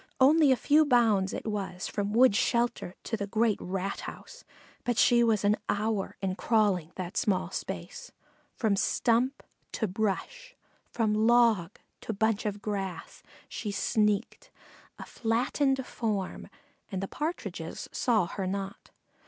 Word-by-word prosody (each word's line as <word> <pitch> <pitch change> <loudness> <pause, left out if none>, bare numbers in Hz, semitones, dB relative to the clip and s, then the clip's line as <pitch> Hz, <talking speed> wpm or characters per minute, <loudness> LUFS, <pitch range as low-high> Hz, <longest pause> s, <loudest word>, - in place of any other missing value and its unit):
Only 290 +2 +6
a - - +5
few 295 +6 +4
bounds 225 -8 +3
it - - -5
was 195 -4 -3
from 205 0 -2
wood 240 0 +5
shelter 235 -5 0
to 225 - -2
the 200 -2 -4
great 220 +1 +1
rat 195 +1 -3
house, - - -9 0.4
but 245 -2 -1
she 240 0 +5
was 220 -3 +2
an 205 +1 +3
hour 210 -1 -1
in 190 -1 0
crawling 195 -6 +1
that 185 0 -6
small 195 -3 0
space. - - -6 0.4
From 215 -4 +1
stump 240 +6 +1 0.3
to 220 - -1
brush, 220 - -3 0.3
from 220 -3 0
log 230 -6 +3 0.2
to 225 - -5
bunch 220 +1 0
of 205 0 -5
grass 195 -3 -4 0.3
she 210 - -5
sneaked, 210 - 0 0.5
a - - -8
flattened 260 +4 0
form, 210 -7 -3 0.4
and 190 - -2
the - - -2
Partridges 315 - -5
saw 220 -7 +2
her 190 +2 -4
not. 195 +1 -5
215 Hz, 140 wpm, -29 LUFS, 195-240 Hz, 0.5 s, Only